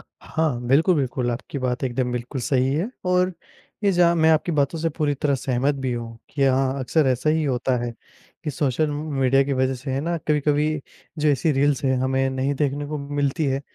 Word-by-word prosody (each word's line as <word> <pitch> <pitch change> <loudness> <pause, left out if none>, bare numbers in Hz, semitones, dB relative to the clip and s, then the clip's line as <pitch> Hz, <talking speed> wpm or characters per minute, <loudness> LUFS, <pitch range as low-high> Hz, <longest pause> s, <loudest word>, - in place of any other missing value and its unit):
हाँ, 155 -7 -3
बिल्कुल, 160 +7 +4
बिल्कुल, 125 -2 -1
आपकी 125 +4 -5
बात 125 0 -2
एकदम 125 0 -1
बिल्कुल 125 +2 -4
सही 130 +1 +1
है 170 +8 0 0.2
और 180 0 +2 0.5
ये 200 - +5
जहाँ 175 -1 +4
मैं 160 -1 +4
आपकी 160 +2 +2
बातों 150 +2 +1
से 165 - 0
पूरी 150 -3 +1
तरह 140 0 0
सहमत 135 +2 0
भी 130 -2 -2
हूँ, 115 -1 -6
कि 140 - -2
हाँ, 135 0 +2
अक्सर 145 +3 +2
ऐसा 130 +4 +1
ही 160 0 +1
होता 130 -1 0
है 120 - -3 0.5
कि 150 - -1
सोशल 145 +2 0
म 150 +1 -4
मीडिया 135 +1 +4
की 140 - -2
वजह 130 0 +1
से 130 +2 -6
है 135 - 0
ना, 170 +3 -1
कभी-कभी 150 +1 +1 0.4
जो 150 0 +2
ऐसी 145 +3 +2
रील्स 140 0 +1
हैं, 130 -1 +2
हमें 130 +1 +1
नहीं 130 +2 -1
देखने 145 0 -1
को 150 0 -4
मिलती 145 +1 -1
है। 135 0 0
140 Hz, 210 wpm, -23 LUFS, 130-150 Hz, 0.5 s, ये